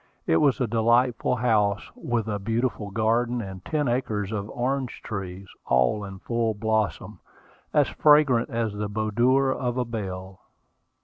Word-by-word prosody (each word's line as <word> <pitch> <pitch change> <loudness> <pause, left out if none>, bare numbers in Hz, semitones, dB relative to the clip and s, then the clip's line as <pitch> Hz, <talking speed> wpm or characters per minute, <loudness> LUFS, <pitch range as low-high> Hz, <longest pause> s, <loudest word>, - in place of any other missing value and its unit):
It 80 - +3
was 135 - +3
a 125 - +2
delightful 120 +2 +2
house, 105 -4 +1
with 115 -2 -2
a 105 -1 -2
beautiful 115 0 -2
garden, 115 +4 +1
and 95 -4 -7
ten 150 +2 -1
acres 110 -5 -1
of 105 -1 -3
orange 130 +2 -2
trees, 95 -2 -6 0.2
all 65 +12 +2
in 95 -1 -7
full 115 +1 -1
blossom, 110 -4 -1 0.5
as - - +3
fragrant 150 -6 +4
as 115 -2 -1
the 105 0 -3
boudoir 120 +6 +2
of 125 -2 -2
a 125 - 0
belle. 95 -4 -6
110 Hz, 145 wpm, -25 LUFS, 100-120 Hz, 0.5 s, fragrant